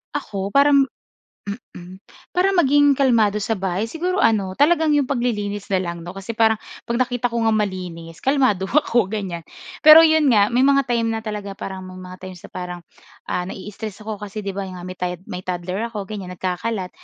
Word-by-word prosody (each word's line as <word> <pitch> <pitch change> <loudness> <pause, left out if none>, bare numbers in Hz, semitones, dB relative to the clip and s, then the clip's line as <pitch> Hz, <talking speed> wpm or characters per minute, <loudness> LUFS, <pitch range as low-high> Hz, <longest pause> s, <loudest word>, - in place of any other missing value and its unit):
Ako, 200 -9 -3
parang 280 +3 +4 0.6
mm. 185 -4 -9 0.4
Para 380 +2 +3
maging 290 -5 +5
kalmado 225 -6 +3
sa 220 +2 -1
bahay 190 +3 -2
siguro 360 +7 -2
ano 200 -4 +2
talagang 315 +1 +4
'yung 285 -3 +3
paglilinis 210 -6 -2
na 190 - +4
lang 170 -2 -5
'no, 175 - -7
kasi 195 +4 -7
parang 220 -1 +3 0.3
'pag 235 +1 -2
nakita 245 -1 0
ko 235 - 0
ngang 220 -1 +3
malinis 180 -4 -4
kalmado 260 -9 +2
ako 240 -9 +2
ganyan. 195 -5 -4 0.4
Pero 310 +1 +10
'yun 315 -1 +4
nga, 210 -3 +4
may 245 - +3
mga 275 -1 +4
time 235 -2 0
na 225 0 -2
talaga 205 -2 -5
parang 190 -1 -6
may 185 0 -10
mga 185 0 -10
times 185 -2 -9
na - - -11
parang, 180 -1 -6 0.5
ah, 180 0 -1
na-i-stress 210 +2 -7
ako 215 -2 -5
kasi, 210 +1 -6
'di 195 - -3
ba 195 0 -4
nga 180 -1 -8
may 185 0 -8
tod 180 -1 -2
may 180 - -6
toddler 185 +4 -3
ako 210 -4 -5
ganyan, 195 -2 -7
nagkakalat. 185 +2 -3
210 Hz, 190 wpm, -21 LUFS, 185-245 Hz, 0.6 s, Pero